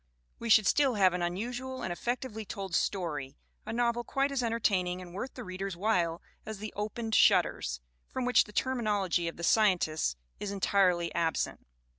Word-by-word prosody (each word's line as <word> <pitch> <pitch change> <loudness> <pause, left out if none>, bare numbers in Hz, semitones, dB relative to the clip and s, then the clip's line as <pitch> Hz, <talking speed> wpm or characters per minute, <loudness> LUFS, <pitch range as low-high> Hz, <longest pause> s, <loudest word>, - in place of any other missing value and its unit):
We 230 - -4
should 215 -1 +7
still 270 +2 +3
have 190 -3 +4
an 180 - -2
unusual 245 +9 -3
and 180 - -2
effec 240 +7 -2
tively 220 -5 -6
told 195 -3 -6
story, 155 -8 -1 0.3
a - - -3
novel 235 0 +1
quite 275 +3 0
as 275 -2 0
entertaining 195 -6 0
and 180 -1 -10
worth 250 +8 -5
the 250 - -6
reader's 185 -1 -5
while 175 -5 0 0.2
as 220 -1 -6
The 215 +1 -7
Opened 220 +2 -3
Shutters, - - +3 0.3
from 255 - -3
which 250 - +5
the 210 - -13
terminology 205 -9 0
of 165 - -5
the 170 - -7
Scientists 175 - +2 0.2
is 200 - -4
en 200 - -4
tirely 180 -3 +2
absent. 165 - -1
200 Hz, 180 wpm, -30 LUFS, 175-235 Hz, 0.3 s, should